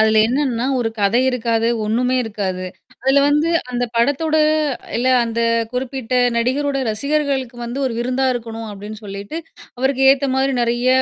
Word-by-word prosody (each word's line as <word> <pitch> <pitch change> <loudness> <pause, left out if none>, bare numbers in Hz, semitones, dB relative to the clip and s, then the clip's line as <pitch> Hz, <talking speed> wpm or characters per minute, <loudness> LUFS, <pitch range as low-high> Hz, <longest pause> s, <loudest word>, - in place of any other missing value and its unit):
அதுல 220 0 +4
என்னன்னா, 255 -1 0
ஒரு 225 - 0
கதை 205 +5 +3
இருக்காது, 230 -2 0 0.2
ஒன்னுமே 250 +4 +1
இருக்காது. 190 -4 -3 0.4
அதுல 270 +1 +4
வந்து 300 +3 +2 0.2
அந்த 245 0 -1
படத்தோட 290 +6 +2 0.6
இல்ல 250 +2 +1 0.2
அந்த 230 0 -2 0.3
குறிப்பிட்ட 255 -1 -3 0.2
நடிகரோட 275 +4 0
ரசிகர்களுக்கு 270 +1 -1
வந்து 240 +3 -5
ஒரு 250 - -2
விருந்தா 255 +2 0
இருக்கணும் 225 -2 -6
அப்பிடின்னு 205 +2 -8
சொல்லிட்டு, 200 +7 -7 0.4
அவருக்கு 265 +1 +1
ஏத்தமாரி 270 0 +1
நிறைய 240 +1 +1
245 Hz, 135 wpm, -19 LUFS, 225-270 Hz, 0.6 s, அதுல